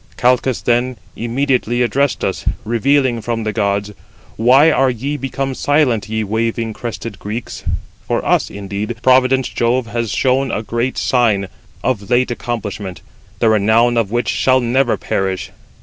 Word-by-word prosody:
Calchas, 125 0 +2
then, 120 +1 +1 0.2
immediately 120 0 0
addressed 140 +3 0
us, 95 - -3 0.2
revealing 120 +1 +2
from 115 0 -2
the 110 -1 -2
gods: 100 -1 0 0.4
'Why 130 +7 +5
are 135 -1 +3
ye 130 +4 -3
become 135 0 -3
silent, 130 -7 +1
ye 110 0 -1
waving 115 +1 -1
crested 115 -3 -6
Greeks? 110 +3 -6 0.4
For - - -1
us, - - +2
indeed, 100 +3 -4
provident 130 0 +3
Jove 120 +1 +1
has 115 0 -3
shown 130 +4 +1
a 110 - -2
great 120 +3 -2
sign, 115 -6 +2
late, 95 - -7 0.3
of 110 -6 -1
late 125 0 +2
accomplishment, 105 -5 -4 0.4
the 115 - +3
renown 110 +3 +3
of 115 -4 +1
which 120 +2 -1
shall 130 0 +3
never 120 +1 +1
perish. 95 -1 -2
120 Hz, 150 wpm, -17 LUFS, 110-130 Hz, 0.4 s, Why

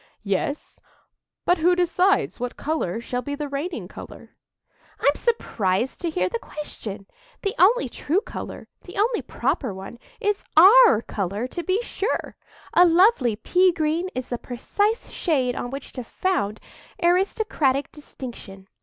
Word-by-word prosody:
"Yes; 200 +9 -2 0.7
but 355 -1 +3
who 355 +3 +4
decides 360 +1 +2
what 245 +1 -4
colour 280 - -2
shall 245 +1 -3
be 285 +2 -4
the 295 0 -4
reigning 290 +5 -4
colour?" - - -12 0.6
"I'm 285 - +4
surprised 235 - -1
to 345 - -1
hear 185 - 0
the 230 - -3
question! 215 -10 -7 0.4
The 395 -1 0
only 405 - +5
true 300 +8 0
colour—the 360 - -9
only 445 +3 +2
proper 235 -9 -2
one—is 240 - -4
our 395 - +8
colour, 200 +3 -3
to 345 - -4
be 380 +8 0
sure. 430 0 -3 0.4
A 355 - +7
lovely 340 - +4
pea 365 - +3
green 330 +2 -1
is 255 0 -4
the 245 - -3
precise 410 - -1
shade 260 -7 0
on 245 - -4
which 275 +2 -7
to 255 - -6
found 230 - -1 0.4
aristocratic 345 - +1
distinction. 230 -9 -10
300 Hz, 135 wpm, -24 LUFS, 240-370 Hz, 0.7 s, our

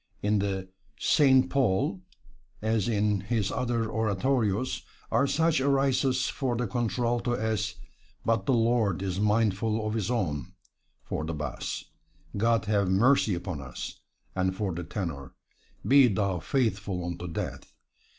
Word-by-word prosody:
In 105 0 +2
the 95 -1 -2 0.3
"Saint 130 -2 +4
Paul," 95 -7 +1 0.6
as 110 -1 0
in 105 -2 +1
his 105 0 -1
other 120 -3 -1
oratorios, 110 +1 0 0.3
are 140 - +3
such 160 -1 +2
arias 135 -1 +2
for 130 -3 -1
the 120 +1 -1
contralto 120 +2 0
as, 110 -2 -1 0.5
"But 115 -4 +1
the 135 - +4
Lord 115 -5 +2
is 95 -1 -2
mindful 105 +1 +1
of 110 - -1
His 110 -2 -1
own"; 90 - -2 0.5
for 80 - -3
the 80 +1 -3
bass, 75 0 -4 0.5
"God 115 +2 +2
have 100 -3 +1
mercy 110 +1 +4
upon 85 -4 -5
us," 65 -2 -7 0.4
and 95 0 0
for 100 -3 -2
the 90 +2 -4
tenor, 80 -6 -5 0.5
"Be 135 -1 +7
thou 100 -4 0
faithful 105 - -1
unto 85 0 -5
death." 85 - -5
110 Hz, 135 wpm, -28 LUFS, 95-120 Hz, 0.6 s, Be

